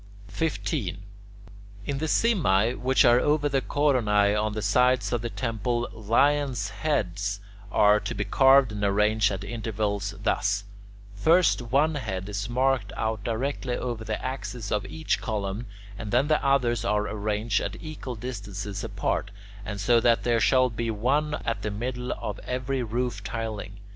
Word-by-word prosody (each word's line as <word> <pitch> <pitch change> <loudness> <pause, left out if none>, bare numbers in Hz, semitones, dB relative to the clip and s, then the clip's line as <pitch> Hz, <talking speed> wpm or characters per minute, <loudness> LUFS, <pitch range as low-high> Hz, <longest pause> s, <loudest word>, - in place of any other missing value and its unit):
15. 135 - -2 0.8
In 140 - -2
the 160 - -1
simae 135 - +3
which 130 +1 +3
are 120 +1 +6
over 150 +2 +2
the 135 -2 +1
coronae 110 -9 +2
on 105 0 0
the 110 - -3
sides 125 0 +2
of 120 - 0
the 120 - -3
temple, 115 +2 -2
lion's 120 +1 +1
heads 100 - -1 0.3
are 105 0 +5
to - - -5
be 100 - -2
carved 135 +3 +5
and 105 -1 -4
arranged 105 +1 +3
at 95 0 -4
intervals 105 -2 -3
thus: 105 0 +1 0.5
First 160 - +3
one 140 +7 +2
head 100 -9 -4
is 100 +2 -4
marked 130 -3 +1
out 110 -2 -2
directly 125 +2 -2
over 120 -3 -4
the 110 -1 -3
axis 125 -4 -5
of 105 -2 -1
each 155 +8 -2
column, 105 0 -3 0.3
and 105 -2 -5
then 130 +5 +2
the 155 - +2
others 125 -5 +2
are 105 -2 +1
arranged 105 +1 -1
at 100 +2 -4
equal 155 -5 -6
distances 105 -4 -5
apart, - - -2 0.3
and 105 0 -5
so 120 +4 +4
that 115 0 +3
there 120 -1 +2
shall 130 +1 +3
be 115 +1 -3
one 140 +8 0
at 115 -3 -1
the 105 - -2
middle 125 +4 -4
of 105 -1 -5
every 130 +1 -2
roof 120 -2 -2
tiling. 110 -2 -5
115 Hz, 160 wpm, -26 LUFS, 105-130 Hz, 0.8 s, are